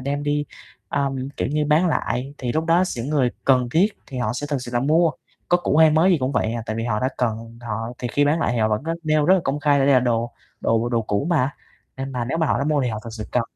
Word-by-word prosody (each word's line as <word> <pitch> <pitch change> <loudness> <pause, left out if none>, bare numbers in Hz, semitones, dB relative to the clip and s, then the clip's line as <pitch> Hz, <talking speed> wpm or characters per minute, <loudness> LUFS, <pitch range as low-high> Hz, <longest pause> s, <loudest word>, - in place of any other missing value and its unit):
đem 140 +2 -2
đi, 145 0 0 0.4
ờm, 135 -2 -2
kiểu - - -1
như, 150 +1 0
bán 155 +4 +3
lại. 140 -4 -1
Thì 125 -2 -2
lúc 160 +4 0
đó 170 +2 +4
s 180 - -5
những 115 +4 -3
người 135 -5 +2
cần 125 -2 +3
thiết 180 +6 +4 0.2
thì 130 - -6
họ 120 - -1
sẽ 145 +4 -4
thực 145 - 0
sự 120 - -7
là 120 - +2
mua, 160 +5 +3 0.4
có 175 - +4
cũ 175 - 0
hay 160 0 +7
mới 160 +5 +4
gì 175 - +3
cũng 130 0 -1
vậy 110 - 0
à, 115 -1 -3
tại 110 - -3
vì 115 - -2
họ 105 -3 -1
đã 130 - +1
cần 115 -1 -3
họ 115 -1 -4
thì 125 - -3
khi 145 +4 +2
bán 150 +3 +2
lại - - +1
thì 120 - -1
họ 110 -1 +2
vẫn 105 +2 -1
rất 165 +2 -2
nêu 155 -1 +2
rất 185 - +6
là 190 - +2
công 140 +2 -1
khai 145 -1 +3
là 135 - +3
đây 140 0 +5
là 130 - +5
đồ 120 -1 0 0.3
đồ 115 +1 +1
đồ 115 -1 0
cũ 105 +5 -1
mà, 145 -4 +1 0.4
nên 135 0 -5
mà 125 -2 -2
nếu 135 +7 -2
mà 160 - +2
họ - - +1
đã 140 - -1
mua 150 -1 +1
thì 125 - 0
họ 110 -2 -3
thực 115 - -7
sự 110 -1 -6
cần. 125 - +2
135 Hz, 305 wpm, -22 LUFS, 120-150 Hz, 0.4 s, hay